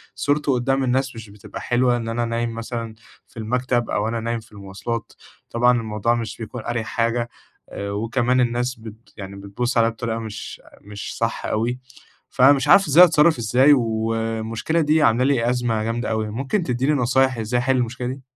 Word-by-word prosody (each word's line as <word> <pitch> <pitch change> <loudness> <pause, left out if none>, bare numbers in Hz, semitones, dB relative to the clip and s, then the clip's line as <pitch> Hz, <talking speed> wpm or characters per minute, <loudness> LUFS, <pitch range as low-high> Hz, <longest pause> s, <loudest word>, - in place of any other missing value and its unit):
صورته 145 -1 +1
قدام 135 +2 0
الناس 130 0 0
مش 110 -2 -9
بتبقى 100 -1 -10
حلوة، 120 0 +2
إن 115 -1 -5
أنا 120 +1 -1
نايم 115 0 -2
مثلًا 115 -1 -5 0.3
في - - -20
المكتب 120 +2 -1
أو 105 - 0
أنا 115 +1 -2
نايم 115 +1 -2
في 110 - -18
المواصلات. 100 +3 -6 0.4
طبعًا 120 +1 +3
الموضوع 110 +1 0
مش 115 -3 -4
بيكون 115 +1 -7
أريح 120 -2 -2
حاجة، 115 +1 -1 0.4
آآ، 100 0 -5
وكمان 120 +4 +1
الناس 120 +1 0
بت 110 0 -13
يعني 100 -1 -8
بتبُص 100 +6 -3
عليّا 115 0 +4
بطريقة 115 0 -4
مش 110 -2 -7 0.2
مش 105 0 -8
صح 115 0 -2
أوي. 120 +3 -1 0.5
فمش 135 +2 +4
عارف 195 +3 +6
إزاي، 155 +5 +8
أتصرّف 160 -1 +4
إزاي؟ 125 +6 +5
والمشكلة 115 +4 -1
دي 155 +1 +3
عاملة 115 +1 +3
لي 125 -4 +2
أزمة 120 -3 0
جامدة 115 +2 -2
أوي، 110 -1 -1
ممكن 135 - -2
تدّيني 130 +1 0
نصايح 130 -1 +2
إزاي 115 +2 -1
أحل 130 +1 +1
المشكلة 125 0 -2
دي؟ 130 +2 -5
120 Hz, 175 wpm, -22 LUFS, 115-130 Hz, 0.5 s, إزاي